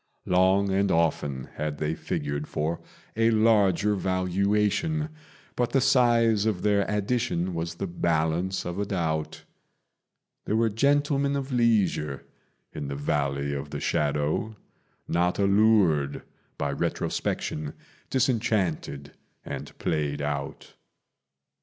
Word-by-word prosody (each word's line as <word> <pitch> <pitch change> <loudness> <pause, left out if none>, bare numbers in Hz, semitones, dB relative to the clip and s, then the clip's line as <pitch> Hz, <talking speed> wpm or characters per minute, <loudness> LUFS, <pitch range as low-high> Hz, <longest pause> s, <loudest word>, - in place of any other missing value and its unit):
Long 95 +2 +3
and 100 +1 +2
often 75 -5 0
had 75 -1 -3
they 75 +1 -1
figured 75 -1 -3
for 80 +3 -2 0.3
a 115 +1 +3
larger 105 -3 +3
valuation, 100 - 0 0.5
But 120 -1 -1
the 135 - +4
size 120 -5 +3
of 100 -5 -1
their 100 -1 +2
addition 105 -4 -1
was 85 0 -3
the 95 - -3
balance 85 +1 0
of 90 +2 -4
a 100 - 0
doubt: 80 -5 -2 1.0
There 110 - 0
were 115 0 +3
gentlemen 140 +3 +2
of 135 0 -3
leisure 110 - +1 0.5
in 75 -2 -5
the 70 - -4
Valley 70 0 -1
of 70 -1 -4
the - - -5
Shadow, 75 +8 0 0.5
Not 90 +1 +1
allured 100 -8 +3 0.3
by 70 0 -1
retrospection, 75 +1 -2 0.3
disenchanted, 105 - 0 0.3
and - - -7
played 75 -2 -1
out. 70 -1 -4
95 Hz, 115 wpm, -26 LUFS, 75-110 Hz, 1.0 s, the